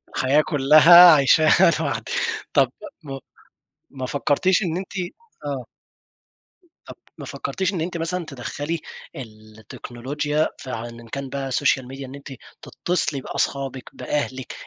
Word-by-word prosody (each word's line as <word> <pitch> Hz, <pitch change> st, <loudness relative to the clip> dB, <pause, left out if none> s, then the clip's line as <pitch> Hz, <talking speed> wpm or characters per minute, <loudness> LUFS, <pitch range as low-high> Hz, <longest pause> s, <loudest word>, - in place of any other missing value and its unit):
الحياة 135 Hz, +3 st, +3 dB
كُلّها 155 Hz, +5 st, +8 dB
عَيشاها 155 Hz, +4 st, +5 dB
لوحدكِ 160 Hz, -3 st, -3 dB, 0.4 s
طب -, -, +3 dB, 0.3 s
م 135 Hz, -2 st, -6 dB, 0.7 s
ما 130 Hz, -2 st, -6 dB
فكرتيش 145 Hz, +9 st, +1 dB
إن 170 Hz, -4 st, -2 dB
أنتِ 190 Hz, +1 st, -6 dB, 0.5 s
آه. 135 Hz, -4 st, -4 dB, 1.2 s
طب -, -, -10 dB, 0.2 s
ما -, -, -8 dB
فكرتيش 190 Hz, +1 st, -3 dB
إن 175 Hz, -, -3 dB
أنتِ 170 Hz, +1 st, -3 dB
مثلًا 170 Hz, +1 st, -3 dB
تَدَخَّلي 145 Hz, +4 st, -5 dB, 0.4 s
التكنولوجيا 120 Hz, +5 st, -4 dB
ف 130 Hz, -, -9 dB
إن 115 Hz, 0 st, -7 dB
كان 140 Hz, +3 st, -6 dB
بقى 135 Hz, 0 st, -4 dB
السوشيال 135 Hz, -1 st, +1 dB
ميديا 135 Hz, +1 st, -8 dB
إن 130 Hz, -, -10 dB
أنتِ 140 Hz, -1 st, -10 dB, 0.3 s
تتصلي 155 Hz, -6 st, -2 dB
بأصحابكِ، 135 Hz, -1 st, -3 dB
بأهلكِ 130 Hz, -3 st, -4 dB
140 Hz, 125 wpm, -22 LUFS, 130-160 Hz, 1.2 s, كُلّها